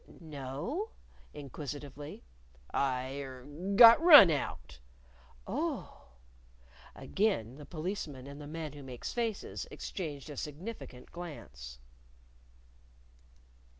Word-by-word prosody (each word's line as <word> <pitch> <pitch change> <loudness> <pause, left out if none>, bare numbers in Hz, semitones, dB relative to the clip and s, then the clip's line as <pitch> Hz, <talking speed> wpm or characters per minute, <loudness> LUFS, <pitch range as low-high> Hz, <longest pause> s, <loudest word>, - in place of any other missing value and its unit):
"No?" 155 - -4 0.4
inquisitively. 145 0 -7 0.5
"I 130 0 0
er 130 -2 -8 0.3
got 230 +5 +10
run 295 - +11
out." 70 - -4 0.7
"Oh!" - - -4 0.9
Again 140 - 0
the 150 - -11
Policeman 155 -6 -5
and 140 +1 -9
the 145 - -8
Man 155 -1 -5
Who 145 - -10
Makes 130 -3 -6
Faces 230 -4 -3
exchanged 150 -5 -6
a 145 - -8
significant 150 - -7
glance. 65 - -9
145 Hz, 90 wpm, -32 LUFS, 135-175 Hz, 0.9 s, run